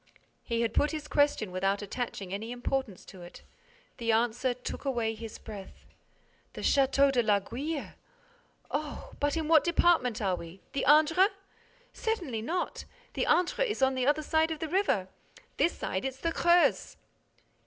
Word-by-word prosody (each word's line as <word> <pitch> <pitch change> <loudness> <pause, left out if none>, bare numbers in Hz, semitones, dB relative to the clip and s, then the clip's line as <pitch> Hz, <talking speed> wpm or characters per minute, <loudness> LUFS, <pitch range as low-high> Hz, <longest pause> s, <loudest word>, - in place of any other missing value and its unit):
He 230 -1 -1
had 230 - 0
put 295 - +2
his 305 -1 -5
question 285 -10 +1
without 195 +2 0
attaching 205 -3 -5
any 220 +4 -4
importance 245 -4 -3
to 185 - -12
it. 175 0 -12 0.5
The 230 -2 0
answer 240 +3 +1
took 250 - -6
away 240 -5 -1
his 225 0 -8
breath: 205 -3 -11 0.7
"The - - -7
Château 275 0 +3
de 250 -2 +3
l'Aiguille?—Oh!—But 290 - -4
in 315 -2 -2
what 320 -1 +6
department 340 -9 +2
are 190 -3 0
we? 170 +2 -10
The 275 - -1
Indre?" 315 +6 +6 0.7
"Certainly 355 - -2
not. 345 +11 -3 0.3
The - - -1
Indre 360 +7 +2
is 420 -10 -1
on 265 0 +4
the 255 0 -1
other 295 +1 +2
side 315 +2 +2
of 320 - -3
the 315 +1 -4
river. 345 - +1 0.5
This 340 - +1
side, 190 - -3
it's 265 -1 -3
the 330 +5 -1
Creuse." 345 +1 +3
265 Hz, 155 wpm, -29 LUFS, 220-315 Hz, 0.7 s, what